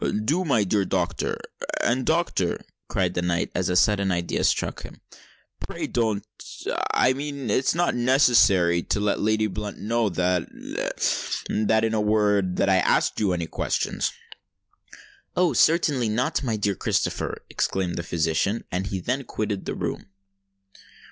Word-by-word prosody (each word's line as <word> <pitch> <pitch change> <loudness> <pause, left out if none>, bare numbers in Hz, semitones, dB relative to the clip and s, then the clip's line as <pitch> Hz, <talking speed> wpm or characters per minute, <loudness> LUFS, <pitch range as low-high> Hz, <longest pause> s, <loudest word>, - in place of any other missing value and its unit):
"Do, 165 +9 +1
my 130 - +2
dear 100 +1 +1
doctor. 90 -2 -1 0.5
And, 125 +1 +1
doctor," 160 - 0 0.2
cried 90 -2 0
the 90 - -1
Knight, 85 0 -1
as 90 0 0
a 90 - 0
sudden 100 +1 +3
idea 85 -1 -1
struck - - 0
him; - - -11 0.6
"pray - - -5
don't—I 115 +3 -1
mean, 140 -4 -4
it - - +3
is 130 - +1
not 175 +1 +1
necessary 120 -9 +4
to 100 - -1
let 105 0 0
Lady 110 +1 +2
Blunt 105 0 -5
know 115 0 0
that—that—in 100 +4 -1
a 110 - +1
word—that 105 -3 +2
I 95 -1 +4
asked 90 - +2
you 100 -3 +2
any 85 -2 -1
questions——" - - -1 1.3
"Oh! 175 -4 +3
certainly 145 -4 +3
not, 120 +6 0
my 120 -5 -1
dear 105 -1 0
Sir - - -14
Christopher," - - -1
exclaimed 95 -2 -1
the - - -2
physician; 85 +6 0
and 95 +2 -2
he 95 - -3
then 125 +9 -2
quitted 105 -4 -3
the - - -3
room. - - -4
105 Hz, 145 wpm, -25 LUFS, 90-120 Hz, 1.3 s, necessary